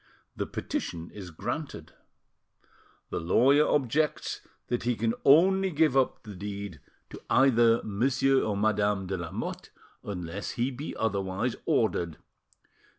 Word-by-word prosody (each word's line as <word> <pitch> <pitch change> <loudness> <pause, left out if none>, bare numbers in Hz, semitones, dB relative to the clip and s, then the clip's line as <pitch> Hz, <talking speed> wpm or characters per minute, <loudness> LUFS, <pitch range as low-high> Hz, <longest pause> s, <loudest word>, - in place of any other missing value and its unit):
The - - -3
petition 85 0 -4
is 95 -4 -9
granted. 80 - -5 1.2
The - - -1
lawyer 135 - +4
objects 145 +3 0 0.2
that 120 - -2
he 120 0 0
can 115 +1 0
only 190 +7 +5
give 155 -4 +2
up 135 -1 +1
the 105 -2 -9
deed 100 -3 -6 0.3
to - - -9
either 120 -3 +4
Monsieur 130 +5 +2
or 105 -2 -1
Madame 105 -2 +1
de 95 +1 -3
Lamotte, 85 -3 -5 0.3
unless 90 0 -5
he 120 +3 -1
be 135 +4 -6
otherwise 100 +2 -1
ordered. 85 -3 +1
110 Hz, 125 wpm, -28 LUFS, 100-135 Hz, 1.2 s, only